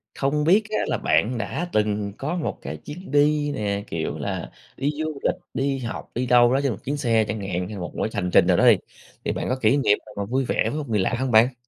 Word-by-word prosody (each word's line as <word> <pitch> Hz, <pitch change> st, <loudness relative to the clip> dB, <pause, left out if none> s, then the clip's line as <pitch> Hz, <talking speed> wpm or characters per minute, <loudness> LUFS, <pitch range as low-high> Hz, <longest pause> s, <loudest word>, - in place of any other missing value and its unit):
không 150 Hz, +2 st, 0 dB
biết 195 Hz, +7 st, +5 dB
á 215 Hz, -, -1 dB
là -, -, 0 dB
bạn 105 Hz, +11 st, +1 dB
đã 175 Hz, +9 st, -3 dB
từng 105 Hz, -1 st, 0 dB
có 155 Hz, +6 st, -3 dB
một 170 Hz, -, -3 dB
cái -, -, -6 dB
chuyến 165 Hz, +2 st, -10 dB
đi 145 Hz, 0 st, +3 dB
nè, 100 Hz, -2 st, -2 dB
kiểu 80 Hz, -1 st, -3 dB
là, -, -, -4 dB, 0.3 s
đi 140 Hz, +2 st, 0 dB
du 155 Hz, -2 st, -3 dB
lịch, -, -, +2 dB, 0.2 s
đi 135 Hz, 0 st, 0 dB
học, 115 Hz, -3 st, -6 dB
đi 125 Hz, +2 st, 0 dB
đâu 120 Hz, 0 st, +5 dB
đó 135 Hz, -, +3 dB
trên 135 Hz, -, +1 dB
một 105 Hz, -, -5 dB
chuyến 145 Hz, +2 st, -1 dB
xe 115 Hz, -5 st, +2 dB
chẳng 110 Hz, -, -3 dB
hạn 90 Hz, -2 st, -2 dB
hay 105 Hz, -, -7 dB
là 100 Hz, -, -6 dB
một 85 Hz, -3 st, -5 dB
cái -, -, 0 dB
hành 90 Hz, -, -1 dB
trình -, -, +6 dB
nào -, -, +4 dB
đó -, -, +5 dB
đi, -, -, +7 dB, 0.5 s
thì -, -, +1 dB
bạn -, -, -3 dB
có 130 Hz, -, +1 dB
kỉ 110 Hz, -, +4 dB
niệm 135 Hz, -7 st, +3 dB
nào -, -, -13 dB
mà 100 Hz, -, -2 dB
vui 130 Hz, +5 st, 0 dB
vẻ -, -, +1 dB
với 150 Hz, -, -4 dB
một 145 Hz, -4 st, -6 dB
người 105 Hz, -2 st, +1 dB
lạ 95 Hz, +5 st, +1 dB
hông 130 Hz, -1 st, -1 dB
bạn? 115 Hz, +4 st, +5 dB
125 Hz, 270 wpm, -24 LUFS, 105-145 Hz, 0.5 s, đi